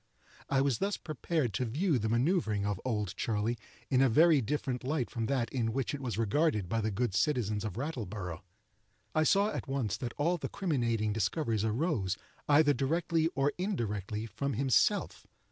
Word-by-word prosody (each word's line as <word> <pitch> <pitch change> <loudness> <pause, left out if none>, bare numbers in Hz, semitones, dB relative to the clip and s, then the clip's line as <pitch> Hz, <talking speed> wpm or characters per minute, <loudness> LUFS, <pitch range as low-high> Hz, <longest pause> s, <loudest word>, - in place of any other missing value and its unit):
I 135 -1 +3
was 135 -4 +1
thus 200 +1 0
prepared 155 - -2
to 125 - 0
view 145 - +1
the 110 0 -1
manoeuvering 120 - +1
of 105 -2 -2
"Old 105 -7 -2
Charley" 115 +1 -1 0.3
in 130 -1 +4
a 135 - +5
very 155 +4 +5
different 130 +1 -2
light 135 -1 -1
from 115 -3 -2
that 130 -4 -1
in 115 -4 0
which 135 +1 -1
it 145 - -4
was 120 -5 -3
regarded 115 - +1
by 115 +5 0
the 110 - 0
good 105 +1 -1
citizens 110 -5 +1
of 105 -2 -4
Rattleborough. 105 - -4 0.7
I 155 - +3
saw 200 +6 +3
at - - -4
once 135 -7 -1
that 120 -2 -5
all 170 +4 +1
the - - -4
criminating 115 - 0
discoveries 110 -1 0
arose, 110 - 0 0.3
either 145 0 +6
directly 160 +5 +1
or 140 +1 +2
indirectly, 110 - -2
from 115 +6 -3
himself. 130 +2 +1
125 Hz, 175 wpm, -31 LUFS, 110-150 Hz, 0.7 s, either